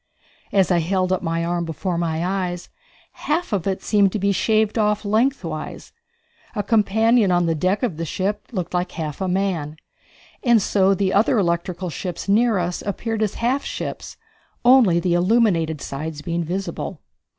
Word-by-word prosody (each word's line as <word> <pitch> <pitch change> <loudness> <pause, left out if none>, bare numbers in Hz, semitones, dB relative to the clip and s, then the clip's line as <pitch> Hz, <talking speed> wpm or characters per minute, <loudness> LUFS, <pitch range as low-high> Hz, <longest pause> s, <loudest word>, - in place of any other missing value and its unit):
As 195 -2 +3
I 175 - +4
held 185 +2 0
up 185 - -1
my 165 -1 -1
arm 175 0 -1
before 170 +2 -3
my 165 0 -1
eyes, 180 -2 -3 0.4
half 310 -4 -2
of 195 -2 -1
it 190 -1 -2
seemed 200 -3 +3
to - - 0
be 200 0 +1
shaved 220 +2 +1
off 210 0 +1
lengthwise; 205 - -1 0.6
a 205 - -1
companion 220 0 +3
on 175 -1 +3
the 165 - +1
deck 185 - 0
of 190 -11 -1
the 165 - -3
ship 195 +5 -3
looked 185 -6 -4
like 180 0 -1
half 155 0 -5
a 190 - 0
man. 180 -5 -1 0.8
So 195 -1 +2
the 190 0 0
other 220 +5 +3
electrical 175 -1 -1
ships 175 +5 -5
near 220 +2 +3
us 175 0 -2
appeared 220 +2 -3
as 215 -3 0
half 265 +3 +1
ships, - - -6 0.5
only 240 -9 +6
the 175 0 0
illuminated 175 - +2
sides 150 +2 -5
being 170 +2 -2
visible. 185 +4 -4
185 Hz, 165 wpm, -22 LUFS, 170-210 Hz, 0.8 s, only